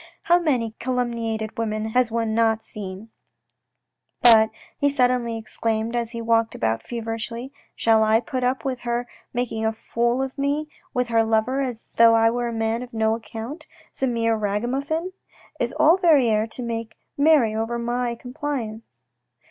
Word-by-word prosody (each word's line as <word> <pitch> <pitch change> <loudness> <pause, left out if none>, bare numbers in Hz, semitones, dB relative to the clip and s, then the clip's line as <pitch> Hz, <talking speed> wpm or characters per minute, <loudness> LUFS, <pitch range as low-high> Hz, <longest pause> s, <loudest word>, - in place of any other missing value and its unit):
" - - -40
How 345 +1 +6
many 255 -9 0
calumniated 230 -3 -2
women 215 -1 -2
has 250 +1 +2
one 225 -1 -1
not 225 -1 +2
seen? 200 +1 -8 0.4
" - - -57
" - - -47
But," 220 -2 +8 0.3
he 285 - +3
suddenly 250 -4 +1
exclaimed, 220 +1 -2
as 235 -1 -1
he 230 -1 -6
walked 230 0 +2
about 110 0 0
feverishly, 230 - -5
" - - -38
shall 225 -1 +3
I 220 +1 +4
put 255 +1 -4
up 255 +2 0
with 260 -2 -2
her 240 0 -2 0.2
making 235 -2 -2
a 220 - +2
fool 235 +3 -1
of 270 +1 -6
me 285 +2 0 0.2
with 250 -1 -1
her 225 -1 +3
lover 225 +5 +1
as 245 -4 -4
though 230 0 +7
I 225 0 +4
were 240 0 -1
a - - -3
man 225 +1 -1
of 250 -1 -9
no 220 0 +2
account, 230 +7 -8 0.2
some 265 -2 -1
mere 230 -1 +2
ragamuffin? 265 - -2 0.5
Is - - 0
all 325 +4 +5
Verrieres 245 - +3
to 250 - -4
make 230 -1 -4 0.2
merry 285 -7 +5
over 225 +2 -2
my 240 0 -1
complaisance 245 -3 -6
230 Hz, 170 wpm, -23 LUFS, 225-250 Hz, 0.5 s, But